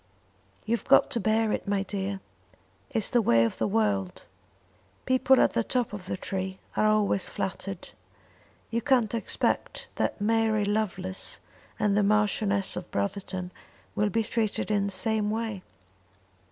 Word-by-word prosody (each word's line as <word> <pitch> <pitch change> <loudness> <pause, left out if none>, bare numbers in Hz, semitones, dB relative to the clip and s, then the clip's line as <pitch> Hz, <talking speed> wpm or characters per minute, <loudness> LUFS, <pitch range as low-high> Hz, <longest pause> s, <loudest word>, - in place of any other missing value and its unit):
"You've 235 +1 -1
got - - +5
to 235 - 0
bear 220 +1 +2
it, - - -2
my 200 -1 +1
dear. 195 0 -3 0.7
It's 225 -7 -1
the 240 - +4
way 115 - +4
of 115 - -3
the - - +1
world. 205 -3 0 0.8
People 260 0 +4
at - - +4
the 235 - +1
top 245 -2 -1
of 190 -3 -7
the 185 - -2
tree 190 0 -4 0.2
are 215 - +3
always 210 -2 +2
flattered. 195 -1 -4 0.8
You 230 +1 0
can't 250 -6 +2
expect 230 - -1
that - - 0
Mary 220 0 +2
Lovelace 195 -3 -2 0.4
and 205 -1 +2
the 210 - +4
Marchioness 205 -1 +1
of 180 - -6
Brotherton 190 -2 -3 0.4
will 210 0 +1
be 225 +2 +1
treated 215 -1 -1
in 205 -1 +2
the 200 - -1
same 210 +2 +1
way." 220 -3 -2
210 Hz, 150 wpm, -27 LUFS, 195-225 Hz, 0.8 s, got